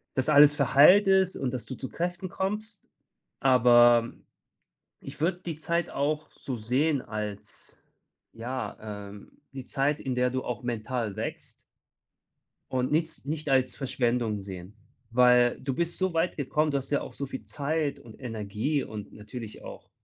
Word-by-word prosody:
dass 130 +1 0
alles 150 -1 +7
verheiltest 185 +7 +5
ist - - -7
und 125 - -1
dass 120 -3 -4
du 130 - -6
zu 130 - -6
Kräften 175 +2 -3
kommst. 205 +2 -3 0.5
Aber, 120 -2 +5 0.9
ich - - -10
würde 175 +3 0
die 165 -3 -4
Zeit 170 +2 -1
auch 150 +2 -2
so 130 - -6
sehen 130 +6 +1
als 105 -3 -6 0.5
ja, 125 +3 -5 0.3
ähm, 100 0 -14
die 135 -2 -8
Zeit, 140 +3 0
in 130 -2 -3
der 125 0 +2
du 130 +1 -3
auch 125 0 -4
mental 115 -2 -3
wächst. 110 - -5 1.2
Und 130 0 0
nichts 160 -3 0
nicht 155 +1 -4
als 130 -1 +2
Verschwendung 120 -5 0
sehen, 95 +1 -9 0.3
weil 125 0 +4
du 135 -1 -2
bist 170 +2 -2
so 185 -2 0
weit 165 +2 0
gekommen, 150 +2 0
du 140 - +1
hast 135 0 -6
ja 145 - +1
auch - - -8
so 140 - -4
viel 130 - -7
Zeit 150 0 -1
und 115 -2 -13
Energie 115 +4 -2
und 105 -1 -8
natürlich 105 +1 -9
auch - - -11
130 Hz, 160 wpm, -28 LUFS, 120-155 Hz, 1.2 s, alles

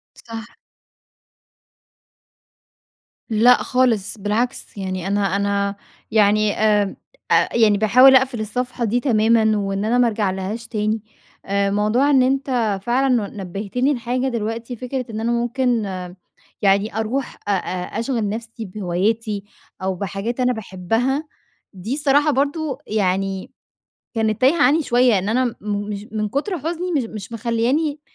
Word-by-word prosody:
صح. 225 0 -10 2.7
لأ 235 +3 +5
خالص 235 -5 +1
بالعكس، 215 +5 -2
يعني 185 -2 -4
أنا 200 -1 +1
أنا 200 0 0 0.3
يعني 215 -1 +3
آآ 210 -2 +2 0.3
أ - - +3
يعني 215 -3 +4
باحاول 255 +5 +7
أقفل 260 -3 +1
الصفحة 245 +3 -3
دي 235 +3 +1
تمامًا، 220 -3 +3
وإن 195 0 -2
أنا 240 +3 +2
ما 245 - +5
أرجعلهاش 210 +1 -2
تاني، 215 -1 -1 0.4
آآ 200 0 +1
موضوع 215 +8 +2
إن 265 -2 +5
أنت 255 -6 +1
فعلًا 255 +4 +1
ن 220 -5 0
نبّهتني 205 +9 -1
لحاجة 250 +2 -1
دلوقتي 230 +1 -3
فكرة 250 +2 -4
إن 220 0 -4
أنا 235 +1 0
ممكن 240 0 0 0.8
يعني 200 +2 +2
أروح 235 +5 -2
أ - - +1
أ 180 -2 -2
أشغل 230 -3 -1
نفسي 225 +2 -6
بهواياتي، 205 +2 -2 0.4
أو 190 0 0
بحاجات 200 +6 -4
أنا 250 0 +3
باحبها، 225 - -1 0.5
دي 200 +7 -4
الصراحة 290 +1 +3
برضه 285 0 -1
يعني 195 -2 -1 0.6
كانت 220 -1 0
تايهة 280 +4 +4
عني 310 +3 +4
شوية، 245 -5 +3
إن 190 - -3
أنا 245 +1 +1
مش 205 0 -4
من 215 -1 -1
كُتر 310 - -2
حُزني 345 +4 -3
مش 275 -6 +1
مش 220 0 -8
مخلياني 250 +7 0
225 Hz, 130 wpm, -21 LUFS, 205-250 Hz, 2.7 s, باحاول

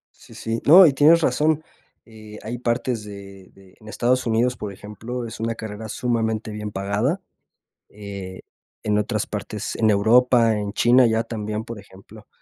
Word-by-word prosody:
Sí, - - -17
sí. 115 0 -4
No, 180 +5 +9
y 145 - +4
tienes 155 +5 +5
razón, 155 +3 +1 0.4
eh, 110 -2 -12
hay 115 +3 -5
partes 120 -1 -2
de 100 -2 -11
de 95 -1 -20
en 110 - -16
Estados 125 +3 0
Unidos, 120 +2 +1
por 105 -2 -6
ejemplo, 115 +5 -7
es 110 - -9
una 115 +1 -2
carrera 110 0 -7
sumamente 110 -2 -2
bien 105 0 -6
pagada, 105 - -1 0.7
eh, 100 -3 -8 0.4
en 105 -1 +1
otras 105 0 -1
partes 105 0 -5
en 110 -1 +2
Europa, 115 +2 +4
en 105 0 -4
China 125 +3 +5
ya 115 0 +1
también, 110 -1 -4
por 115 -1 -8
ejemplo, 100 +2 -16
110 Hz, 165 wpm, -22 LUFS, 105-120 Hz, 0.7 s, No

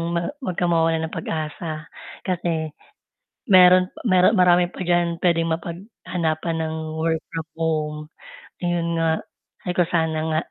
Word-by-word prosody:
ma 170 - -1
huwag 185 -9 -3
kang 175 -1 +1
mawalan 165 -1 +2
ng 160 - -8
pag-asa, 155 0 -4 0.4
kasi 165 -4 -1 0.8
meron 185 -1 +7 0.2
mero 185 +2 +5
marami 180 -2 +4
pa - - -10
diyan 175 -1 +1
puwedeng 165 -2 +2
mapaghanapan 170 -2 -3
ng 160 0 -3 0.2
work 160 0 0
from 165 -1 -4
home." 155 -2 -1 0.7
Iyon 170 -1 0
nga, 165 0 +2 0.6
ay - - +1
kung 175 -1 +2
sana 160 -2 +1
nga, 155 - +2
170 Hz, 135 wpm, -23 LUFS, 160-180 Hz, 0.8 s, meron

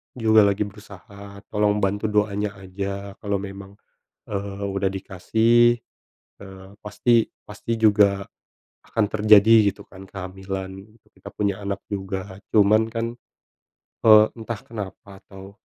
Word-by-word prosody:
juga 110 -3 +4
lagi 100 +1 0
berusaha, 100 0 -12
tolong 105 -1 +1
bantu 100 +2 0
doanya 105 -1 -1
aja, 100 +1 -6
kalau 100 -1 -2
memang, 100 0 -7 0.6
eee, 100 0 -4
udah 100 -1 -1
dikasih, 110 +5 +2 0.7
eee, 95 -1 -12
pasti 115 +3 +1 0.2
pasti 110 +2 -5
juga 100 -3 +3 0.6
akan 110 - 0
terjadi 110 0 +5
gitu - - -13
kan 95 0 -14
kehamilan, 95 +1 -7 0.2
kita - - -13
punya 100 -2 -1
anak 100 -1 -5
juga. 95 -1 -5 0.2
Cuman 110 +1 +4
kan, 115 +1 -4 0.9
eee, 110 -1 +8
entah 115 -1 -6
kenapa 100 -2 -9
atau 95 +1 -13
100 Hz, 120 wpm, -23 LUFS, 95-110 Hz, 0.9 s, eee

